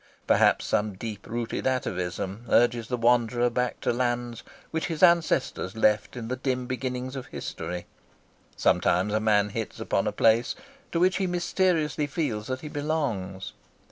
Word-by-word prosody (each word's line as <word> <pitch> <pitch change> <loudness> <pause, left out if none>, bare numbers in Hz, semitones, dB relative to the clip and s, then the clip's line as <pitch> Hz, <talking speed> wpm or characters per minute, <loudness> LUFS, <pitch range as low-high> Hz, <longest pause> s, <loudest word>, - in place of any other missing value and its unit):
Perhaps - - +4
some 105 -1 0
deep 105 0 -7
rooted 120 +2 -2
atavism 95 -3 -2
urges 120 -1 +3
the 125 - -1
wanderer 120 0 +3
back 125 +1 -1
to - - +1
lands 120 -1 -1 0.3
which 160 -1 -1
his 165 -2 -3
ancestors 170 - +3
left 110 +2 +2
in 115 -2 -5
the 125 - -2
dim 130 -1 -1
beginnings 130 +1 -3
of 130 - -6
history. 90 0 -5 0.7
Sometimes 95 +4 +2
a 110 - +2
man 105 -2 +3
hits 110 +1 -5
upon - - 0
a - - +1
place 115 +2 +3 0.4
to 170 - 0
which 185 +1 +3
he 190 - 0
mysteriously 175 -4 +1
feels 135 -9 -2
that 130 0 -3
he 155 - -6
belongs. 140 -12 -3
120 Hz, 155 wpm, -27 LUFS, 110-145 Hz, 0.7 s, Perhaps